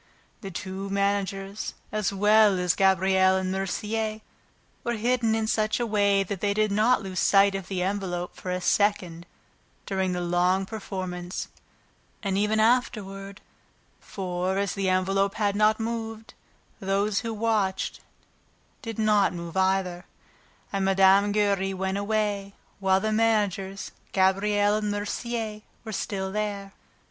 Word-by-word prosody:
The 195 - -6
two 190 +2 -5
managers, 200 0 -2 0.2
as 215 -2 0
well 210 0 +4
as 180 -1 +2
Gabriel 190 0 +3
and 190 0 -1
Mercier, 215 +3 -2 0.6
were 240 0 -1
hidden 230 0 +1
in 220 -1 0
such 215 0 0
a 240 - 0
way 200 -2 +2
that 195 0 -5
they 200 -1 +1
did 215 -1 +1
not 220 +3 +3
lose 185 -2 -4
sight 200 0 +5
of 195 -2 -5
the 185 -2 -2
envelope 185 -2 -3
for 185 - -7
a 180 0 -1
second 180 -5 +1 0.6
during 190 -1 -1
the 180 +2 +1
performance 185 -3 -5 0.7
and 195 -2 -1
even 210 +2 +1
afterward, 200 -4 0 0.6
for, 185 0 -3
as 200 -2 0
the 195 -2 -1
envelope 195 +2 +1
had 205 -2 0
not 215 +1 +3
moved, 225 -1 -4 0.5
those 200 +1 0
who 230 - -4
watched 215 -4 0
it - - -26 0.8
did 225 -4 -6
not 210 -3 +3
move 170 -1 -7
either; 190 -1 0 0.7
and 195 -1 0
Mme. 195 +1 +5
Giry 200 -2 +1
went 190 +1 -2
away 205 -1 -1 0.2
while 190 -1 +3
the 215 +2 -1
managers, 205 -3 0 0.2
Gabriel 205 +2 +3
and 210 -1 -2
Mercier 215 +1 -3 0.2
were 220 - -5
still 190 -1 -3
there. 200 -1 -3
200 Hz, 135 wpm, -26 LUFS, 190-215 Hz, 0.8 s, sight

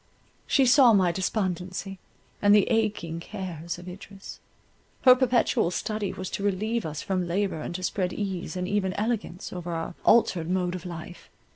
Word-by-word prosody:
She 270 - +4
saw 250 -1 +7
my 185 -4 +4
despondency, 185 0 -3 0.4
and 205 0 +6
the 205 - +4
aching 210 -7 0
cares 170 -2 -6
of 175 +1 -11
Idris. 195 +2 -10 0.6
Her 255 - +9
perpetual 250 -5 +2
study 215 +2 -2
was 185 -1 -6
to 200 - -3
relieve 210 +1 0
us 150 -1 -5
from 185 -2 -1
labour 185 -2 -1
and 175 - -5
to 185 - -5
spread 180 0 -1
ease 190 -2 -4
and 180 0 -2
even 195 -2 0
elegance 210 -4 -3
over 175 -1 -5
our 165 +1 -4
altered 180 -7 +3
mode 180 -1 0
of 180 -1 -6
life. 170 0 -9
190 Hz, 165 wpm, -26 LUFS, 175-210 Hz, 0.6 s, Her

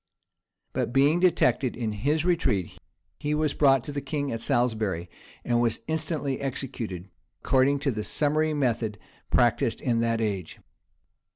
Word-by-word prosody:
But - - -1
being 140 +6 +4
detected 140 -8 +2
in 115 -3 -2
his 145 +10 0
retreat, 130 - 0 0.4
he 150 +2 -1
was 155 -1 +1
brought 135 -4 +4
to 145 - -6
the 140 0 -3
king 140 +1 -3
at 115 - -4
Salisbury; 110 -9 0 0.3
and 120 -1 +2
was 115 -2 0
instantly 155 -3 -2
executed, 115 -9 -4 0.3
according 135 +2 +3
to 140 - +1
the 105 -3 -3
summary 155 +5 0
method 115 -6 0 0.3
practised 120 0 +2
in 120 -3 0
that 115 -1 +1
age. 100 -6 -3
130 Hz, 145 wpm, -26 LUFS, 115-145 Hz, 0.4 s, being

